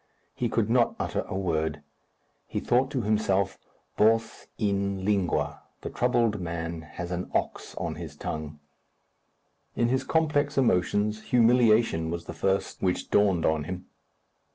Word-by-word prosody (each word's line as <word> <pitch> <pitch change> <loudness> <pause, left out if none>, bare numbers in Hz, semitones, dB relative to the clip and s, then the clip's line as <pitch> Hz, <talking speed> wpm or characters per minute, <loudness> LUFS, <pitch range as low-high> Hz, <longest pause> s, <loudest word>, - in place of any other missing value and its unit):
He 120 - -1
could 110 -2 +1
not 120 +1 +3
utter - - -2
a - - -3
word. 80 -5 -1 0.6
He - - -2
thought 130 +2 +2
to 130 -5 -2
himself, 100 -2 +1 0.4
Bos 115 +1 +2
in 100 -2 0
lingûa. 100 -4 0 0.2
The - - -5
troubled 120 -5 +1
man 85 -1 -4
has 85 +3 -7
an 90 +1 -3
ox - - -2
on - - -3
his - - -8
tongue. 75 -1 -5 1.2
In 120 0 +2
his 130 +1 +1
complex 150 -3 +1
emotions, 105 -2 +2
humiliation 115 -8 +4
was 85 0 -4
the - - -6
first 95 0 -1
which 90 -1 -1
dawned 100 -5 +3
on 80 -2 +1
him. 90 +2 -6
100 Hz, 140 wpm, -27 LUFS, 85-115 Hz, 1.2 s, humiliation